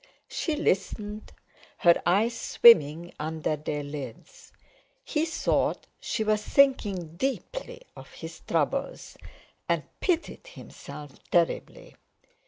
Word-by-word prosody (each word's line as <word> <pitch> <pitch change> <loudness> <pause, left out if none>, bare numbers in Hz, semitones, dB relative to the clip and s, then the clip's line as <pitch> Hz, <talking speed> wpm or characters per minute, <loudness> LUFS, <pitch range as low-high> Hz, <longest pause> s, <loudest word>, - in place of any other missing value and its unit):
She 315 - -2
listened, 210 -2 -2 0.5
her 170 -1 +5
eyes 210 +7 +3
swimming 170 -8 +5
under 155 0 -2
their 150 0 -4
lids. 145 -5 -9 0.5
He 315 +2 -1
thought 325 - 0
she 220 - -2
was 215 0 +1
thinking 200 - +2
deeply - - -4
of - - -12
his - - -9
troubles, - - -2 0.5
and - - +1 0.2
pitied 360 +7 -1
himself 150 - -11
terribly. 175 - -1
205 Hz, 100 wpm, -27 LUFS, -, 0.5 s, her